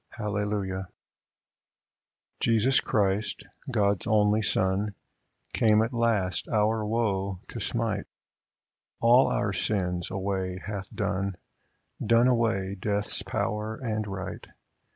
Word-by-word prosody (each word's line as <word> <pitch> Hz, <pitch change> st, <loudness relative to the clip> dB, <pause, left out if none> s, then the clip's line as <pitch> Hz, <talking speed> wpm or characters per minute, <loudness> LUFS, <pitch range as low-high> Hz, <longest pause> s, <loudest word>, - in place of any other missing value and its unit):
Hallelujah! 105 Hz, -3 st, -2 dB
50 -, -, -33 dB, 1.5 s
Jesus 115 Hz, +3 st, +4 dB
Christ, 105 Hz, 0 st, 0 dB, 0.3 s
God's 100 Hz, -5 st, +1 dB
only 105 Hz, 0 st, +3 dB
Son, 100 Hz, 0 st, +1 dB, 0.6 s
Came 110 Hz, -1 st, +4 dB
at 115 Hz, +3 st, -3 dB
last 110 Hz, -7 st, +1 dB
our 110 Hz, 0 st, +2 dB
woe 100 Hz, -4 st, -1 dB
to -, -, -6 dB
smite, -, -, -1 dB, 0.9 s
All 120 Hz, +3 st, +6 dB
our 100 Hz, -1 st, 0 dB
sins 90 Hz, -4 st, -1 dB
away 95 Hz, -1 st, -2 dB
hath 100 Hz, 0 st, -6 dB
done, 100 Hz, -2 st, -2 dB, 0.7 s
Done 115 Hz, +2 st, +4 dB
away 115 Hz, -6 st, +1 dB
Death's 100 Hz, +1 st, -1 dB
power 105 Hz, +1 st, -2 dB
and 110 Hz, -3 st, -3 dB
right. 95 Hz, -1 st, -5 dB
105 Hz, 105 wpm, -27 LUFS, 95-110 Hz, 1.5 s, All